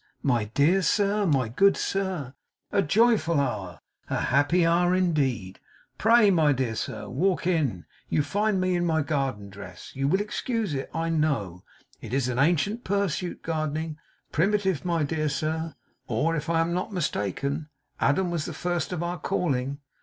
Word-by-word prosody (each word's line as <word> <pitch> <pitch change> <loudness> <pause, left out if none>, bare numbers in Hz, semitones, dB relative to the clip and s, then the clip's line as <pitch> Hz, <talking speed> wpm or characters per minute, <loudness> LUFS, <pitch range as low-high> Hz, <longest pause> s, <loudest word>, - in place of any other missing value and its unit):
My 120 -6 +2
dear 145 - +3
sir; 205 +2 +2
my 135 -6 +2
good 195 - +3
sir! 185 -9 -2 0.4
A 200 - +3
joyful 200 -3 +3
hour, 100 - -2 0.3
a - - 0
happy 145 +7 +3
hour 175 +2 +3
indeed. 135 - 0 0.4
Pray, 225 -2 +6
my 155 -5 +4
dear 130 -4 -1
sir, - - -4
walk 175 +5 0
in. 145 - 0 0.2
You 150 - +2
find 205 +6 0
me 185 0 +1
in 175 - +1
my 160 -2 +1
garden 135 -9 -2
dress. 90 -3 -11
You 135 +1 0
will 190 +7 +3
excuse 215 - -2
it, 135 -1 -3
I 165 +1 -2
know. 135 - -1 0.4
It 125 - -4
is 130 -2 +1
an 125 0 -1
ancient 175 - +2
pursuit, 190 -3 -1
gardening. 155 -1 -2 0.3
Primitive, 190 -1 +1
my 170 -3 0
dear 155 +1 -1
sir. 160 +2 -2 0.3
Or, 150 +8 +1
if 155 +1 -3
I 165 -1 +3
am 165 +1 0
not 180 +5 -2
mistaken, 145 - -2 0.3
Adam 175 +6 +2
was 165 -3 -2
the - - -5
first 175 -2 -2
of 175 -2 -2
our 175 0 -3
calling. 140 -3 -1
160 Hz, 165 wpm, -26 LUFS, 140-180 Hz, 0.4 s, Pray